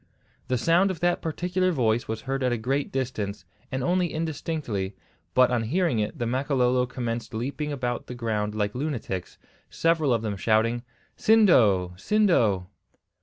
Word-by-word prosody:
The 130 0 +1
sound 170 +9 +3
of 185 -4 -4
that 175 0 +1
particular 180 +3 0
voice 120 -6 +1
was 110 0 -4
heard 135 0 -3
at 125 -1 +1
a 120 - 0
great 135 +5 -1
distance, 110 -8 -3 0.3
and 130 -1 -2
only 180 +2 +1
indistinctly, 150 - -3 0.4
but 130 -1 +5
on 120 -2 +1
hearing 150 +2 +1
it 105 +8 -2
the 120 - -2
Makololo 125 0 +1
commenced 115 -3 -4
leaping 140 +6 -3
about 125 -4 -3
the 125 - -6
ground 105 -3 -2
like 105 -1 -1
lunatics, 125 - -4 0.3
several 165 -4 +1
of 115 -2 +1
them 105 -3 -2
shouting, 115 +4 +2 0.4
"Sindo! 115 - +4
Sindo!" 115 - +2
125 Hz, 155 wpm, -26 LUFS, 110-155 Hz, 0.4 s, but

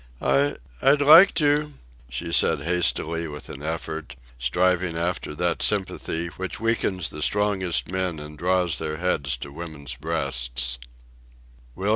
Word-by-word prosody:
"I 70 +2 +2 0.3
I'd 140 +2 +5
like 165 +7 +8
to," 150 -1 +1 0.3
she 65 -1 -5
said - - +4
hastily 85 -1 0
with 75 -1 -9
an 70 - -8
effort, 80 -2 -5 0.2
striving 90 +6 +1
after 85 -3 -2
that 85 +2 -1
sympathy 95 -4 0 0.2
which 95 - -4
weakens 100 -6 0
the 75 - -8
strongest 100 -2 0
men 90 -2 -2
and 75 0 -9
draws 90 0 +1
their 75 0 -4
heads 70 -7 -1
to 70 +3 -8
women's 75 -4 -7
breasts. 60 -4 -2
85 Hz, 130 wpm, -24 LUFS, 75-95 Hz, 0.3 s, like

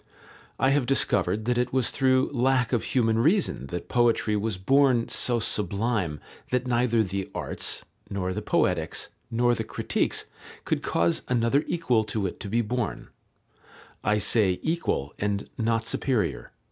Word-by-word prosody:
I 130 +2 +3
have 140 -3 +1
discovered 105 -6 +1
that 125 0 +1
It 125 - 0
was 130 -2 +1
through 130 +1 +2
lack 130 0 +1
of 120 - +1
human 115 -3 +1
reason 160 - +2
that 90 +5 -5
poetry 115 -3 +2
was 105 -2 -1
born 130 +3 +3
so 120 -1 +2
sublime 100 -5 -1 0.3
that 125 0 0
neither 120 -2 +2
the 95 -1 -4
Arts, - - -3 0.2
nor 95 -2 -2
the - - -3
Poetics, - - 0 0.2
nor 120 +1 +2
the - - -2
Critiques - - -1 0.4
could - - 0
cause 85 0 +1
another 125 +3 +2
equal 125 -10 +1
to 105 -2 -2
it 90 - -4
to 100 - -6
be 115 +3 +2
born, 115 -2 -3 0.9
I 105 +1 +2
say 100 -3 +3
equal, 160 - -1
and 100 0 -1
not 115 0 0
superior." 105 - -1
115 Hz, 150 wpm, -26 LUFS, 100-125 Hz, 0.9 s, I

